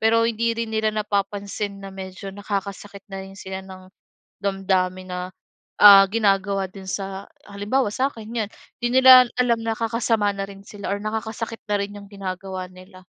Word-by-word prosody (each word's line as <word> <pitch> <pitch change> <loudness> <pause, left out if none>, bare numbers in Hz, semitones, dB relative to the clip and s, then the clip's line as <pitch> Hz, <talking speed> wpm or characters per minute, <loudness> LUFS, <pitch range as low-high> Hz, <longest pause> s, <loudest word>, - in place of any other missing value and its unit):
Pero 230 +1 +4
hindi 230 0 0
rin 230 0 -2
nila 220 0 +1
napapansin 200 -1 -2
na 195 - -7
medyo 190 +1 -7
nakakasakit 200 0 -5
na 195 0 -6
rin 195 0 -12
sila 190 -1 -6
ng 185 -1 -12 0.6
damdamin 185 -1 0
na, 180 0 -4 0.6
ah, 200 -1 +11
ginagawa 195 -2 +1
din 195 0 -11
sa 195 0 -4 0.2
halimbawa 205 +5 0
sa'kin, 245 -3 -2 0.2
'yon. 205 - -11 0.3
Hindi 240 +2 +3
nila 255 -1 +10
alam 235 -2 +2
nakakasama 225 -2 0
na 195 - -2
rin 195 -1 -11
sila 200 -1 -5
or - - -3
nakakasakit 220 +1 -4
na 205 - +2
rin 200 +1 -4
'yong 200 0 -11
ginagawa 190 -1 -5
nila. 185 0 -15
200 Hz, 160 wpm, -23 LUFS, 195-220 Hz, 0.6 s, ah